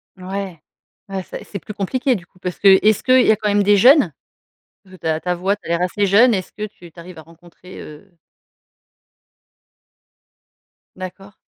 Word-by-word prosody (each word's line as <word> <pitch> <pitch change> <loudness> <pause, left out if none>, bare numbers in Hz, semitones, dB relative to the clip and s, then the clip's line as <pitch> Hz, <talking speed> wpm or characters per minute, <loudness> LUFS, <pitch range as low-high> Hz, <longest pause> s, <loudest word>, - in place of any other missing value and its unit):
Ouais, 185 -3 -7 0.5
ouais, 190 -1 -4
ça - - -9
et - - -12
c'est 200 - -8
plus 210 - -10
compliqué, 250 +6 -1
du 175 - -8
coup, 185 - -28
parce 180 -1 -5
que 195 -1 +6
est-ce 215 -1 +2
qu'il 255 0 +4
y - - +6
a - - +4
quand 210 0 -2
même 205 0 +2
des 205 0 +4
jeunes? 250 - +5 0.7
Heu, 185 0 -15
ta 160 -2 -2
ta 180 +1 -2
voix, 190 +3 -1
tu - - -26
as - - -8
l'air 170 +1 0
assez 200 +3 0
jeune. 225 +5 +5
Est-ce 185 -2 -3
que 215 - -6
tu 175 -5 -14
tu 170 - -16
arrives 170 -1 -11
à - - -10
rencontrer 170 +3 -16
heu 155 +6 -13 2.9
D'accord. 195 +2 -10
190 Hz, 195 wpm, -19 LUFS, 175-205 Hz, 2.9 s, que